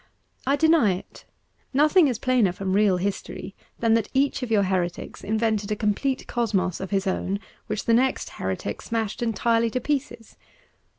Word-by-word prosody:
I 275 - +4
deny 315 - +4
it. 180 - -12 0.5
Nothing 305 +4 +5
is 250 -5 -1
plainer 245 -6 +2
from 190 0 -3
real 200 -2 +4
history 195 0 -4 0.3
than 230 -1 +3
that 225 -2 +1
each 275 0 +2
of 250 - -3
your 210 -3 +3
heretics 180 -2 -2
invented 215 0 0
a - - +1
complete 220 +6 -1
cosmos 200 -7 -1
of 190 - -5
his 195 -1 0
own 190 +1 -1 0.3
which 215 -1 -3
the 230 - +3
next 260 +3 +2
heretic - - -3
smashed 225 -2 -3
entirely 230 0 +1
to 255 - -2
pieces. 255 -4 -3
225 Hz, 165 wpm, -25 LUFS, 200-250 Hz, 0.5 s, Nothing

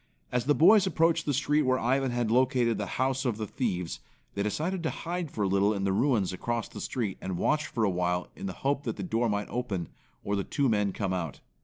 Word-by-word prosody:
As 125 -1 0
the 145 +1 +3
boys 195 +4 +6
approached 165 -2 +2
the - - +3
street 150 +3 +2
where 130 -2 +2
Warren 130 +3 +1
had 120 -2 -1
located 125 -2 +2
the 105 - -2
house 130 +1 +1
of 120 -5 -1
the 110 - -3
thieves, 95 -8 -2 0.3
they 100 - -2
decided 160 - -1
to 160 - -1
hide 175 -1 -4
for 105 - -2
a - - +2
little 100 +2 +2
in 100 - -2
the 95 -1 +1
ruins 105 -5 +2
across 115 +4 -2
the - - -9
street, 110 -7 -3
and 95 -2 -3
watch 150 - +1
for 115 - -2
awhile 90 -2 0
in - - -5
the 95 - -4
hope 140 0 +2
that - - -2
the - - -5
door 120 -9 0
might 105 0 -2
open, 105 -9 -3 0.3
or 100 - -1
the 100 - -1
two 140 +6 0
men 105 -3 +2
come 95 -1 -2
out. 85 -5 -3
120 Hz, 235 wpm, -29 LUFS, 100-140 Hz, 0.3 s, boys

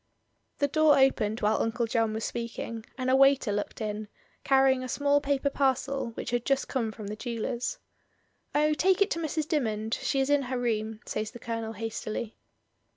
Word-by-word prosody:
The 285 - +2
door 310 +1 +4
opened 235 -5 +2
while 210 +1 +2
Uncle 230 +1 0
John 225 -1 +1
was 220 - -3
speak 235 0 -4
ing, 225 -1 -5
and 255 -1 -2
a - - +5
waiter 270 -4 +5
looked 205 +2 -3
in, 215 0 -3 0.4
carrying 265 -1 +4
a 255 - -5
small 285 +1 +2
paper 280 0 0
parcel, 270 -1 0
which - - -4
had 240 -1 0
just 275 +1 +1
come 235 -5 -1
from 215 -1 -9
the 205 +1 -4
jeweller's. 235 - -3 0.8
"Oh, 300 +1 +3
take 375 +5 +4
it 400 - -6
to 335 - 0
Mrs. 315 -1 -2
Dymond, 220 -8 -1
she 275 - 0
is 270 +1 +1
in 290 -1 +4
her 255 -1 -3
room," 220 -2 -2
says 215 0 -3
the 240 - -10
Colonel 230 -1 -4
hastily. 220 0 -4
245 Hz, 190 wpm, -28 LUFS, 220-280 Hz, 0.8 s, a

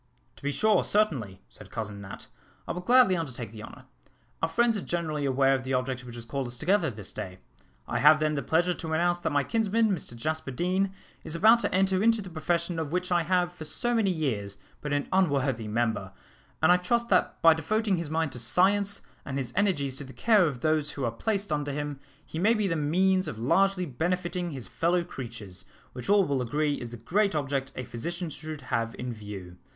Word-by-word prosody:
"To - - -17
be 140 - -1
sure, 215 +4 +3
certainly," 135 - 0
said - - -15
Cousin 105 -2 -5
Nat, 95 -1 -9 0.4
"I - - -2
will 180 - -4
gladly 245 -1 +5
undertake 130 - -4
the 110 -1 -9
honour. - - -11 0.6
Our 165 - +1
friends 235 +4 +2
are 205 - -2
generally 155 -5 -2
aware 135 0 +3
of 130 -2 -1
the 130 0 -1
object 130 0 -2
which 120 -1 -9
has 120 -1 -8
called 135 +1 -3
us 120 0 -5
together 190 - +2
this 105 -5 -6
day. 90 -1 -6 0.5
I - - -1
have, 150 +1 +7
then, 155 0 +1
the 145 - -1
pleasure 170 +7 +2
to 160 -2 -5
announce 175 +2 +2
that - - -2
my 145 -1 +2
kinsman, 225 +1 +1
Mr 155 -9 -3
Jasper 155 +5 -2
Deane, 185 +8 0 0.3
is 160 - -4
about 220 +7 +6
to - - -1
enter 190 0 +2
into 225 +1 +4
the 190 -3 -7
profession 170 +1 -1
of 155 -2 -3
which 180 +1 -1
I 175 -1 +4
have, 175 +1 +1
for 175 -3 -9
so 240 +10 0
many 225 -4 +2
years, 115 - -2 0.2
been 150 - -4
an 145 0 0
unworthy 140 - +1
member, 110 -3 -1 0.5
and 160 - +7
I 180 - +6
trust 235 +6 0
that 185 - +2
by 165 -1 +9
devoting 200 +5 0
his 165 -3 -3
mind 160 -1 0
to 125 - -6
science, 200 - +2 0.2
and 140 -1 -4
his 125 -3 -3
energies 145 -10 +1
to - - -4
the 130 -1 -11
care 215 -6 +4
of 130 -5 -4
those 155 -1 +1
who 140 -3 -3
are 115 - 0
placed 200 - -2
under 145 -1 -1
him, 145 -1 -4 0.3
he 160 - -6
may 220 +6 +4
be 210 -2 +1
the 165 - 0
means 185 +5 +2
of 115 - -5
largely 185 - +2
benefiting 175 +4 -2
his 130 - -7
fellow 170 - +1
creatures, 115 - -8 0.3
which 125 +7 -6
all 200 -1 +5
will 140 -4 0
agree 145 +4 0
is 120 - -5
the 120 - -8
great 195 - +1
object 135 -2 -1
a 130 - -4
physician 170 +9 -5
should 155 0 -7
have 115 -2 -2
in 125 -1 -4
view. 100 -5 -9
155 Hz, 220 wpm, -28 LUFS, 130-185 Hz, 0.6 s, by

